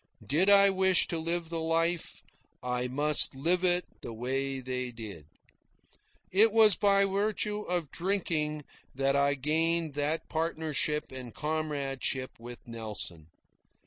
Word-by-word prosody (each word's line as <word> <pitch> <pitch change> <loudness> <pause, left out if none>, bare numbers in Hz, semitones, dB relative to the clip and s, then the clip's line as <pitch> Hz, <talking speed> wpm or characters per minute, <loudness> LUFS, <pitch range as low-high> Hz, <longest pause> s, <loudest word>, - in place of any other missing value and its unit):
Did 170 +8 +2
I 200 -1 +7
wish 190 -1 +3
to 165 - -2
live 165 0 -2
the 165 -1 -3
life, 165 +1 -1 0.4
I 125 0 -2
must 145 +2 +4
live 170 +7 +1
it 180 0 +2 0.2
the - - -7
way 135 +4 -3
they 125 -1 -4
did. 105 -10 -9 1.0
It 210 +4 +5
was 215 -3 +6
by 200 -1 +4
virtue 210 +1 -1
of 175 -7 -3
drinking 165 -5 -1 0.3
that 135 +1 +1
I 140 0 +2
gained 160 +3 0
that 150 +3 -2
partnership 155 -2 -1
and 125 -3 -8
comradeship 140 -5 -3
with 120 +1 -9
Nelson. 105 -8 -5
155 Hz, 130 wpm, -29 LUFS, 130-175 Hz, 1.0 s, I